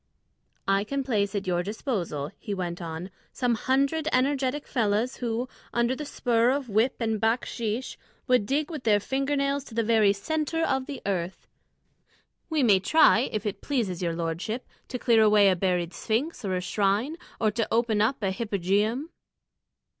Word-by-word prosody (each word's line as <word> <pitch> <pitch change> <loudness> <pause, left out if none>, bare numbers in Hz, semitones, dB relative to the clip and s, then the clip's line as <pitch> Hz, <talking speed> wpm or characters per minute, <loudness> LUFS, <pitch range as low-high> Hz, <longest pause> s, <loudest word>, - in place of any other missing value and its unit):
"I 195 0 +3
can 275 +5 -2
place 210 -5 0
at 200 - -2
your 175 -1 +1
disposal," 180 - -3
he 205 - -4
went 180 -1 -4
on, 165 +2 -6 0.2
"some 245 -2 0
hundred 275 +6 +1
energetic 270 +2 +1
fellahs 225 0 0
who, 240 +1 -2 0.3
under 240 +2 +1
the 300 - -6
spur 240 -4 +2
of 270 -1 -1
whip 220 +5 +2
and 220 -3 -1
bakshîsh, 230 +1 -1 0.3
would 250 -6 +2
dig 295 +4 0
with 305 -5 -6
their 210 -2 +4
finger 275 +6 -1
nails 280 0 0
to 225 - -11
the 230 - +2
very 220 -2 +4
centre 315 +10 -1
of 265 -3 0
the 285 - -7
earth. 185 -2 -3 1.0
We 310 -4 +1
may 205 -5 +5
try, 270 +2 +4
if 215 -2 -3
it 205 - -3
pleases 220 - -1
your 170 -2 -1
lordship, 170 +9 -3 0.2
to 250 - -4
clear 235 -2 +4
away 210 -2 +6
a 185 - +3
buried 180 -1 0
sphinx 250 +5 -2
or 190 -2 -1
a 180 - -1
shrine, 205 - 0 0.2
or 215 -2 +2
to 225 +1 -1
open 225 -2 +2
up 225 +1 +1
a 195 - +1
hypogeum." 210 - 0
225 Hz, 170 wpm, -27 LUFS, 200-265 Hz, 1.0 s, away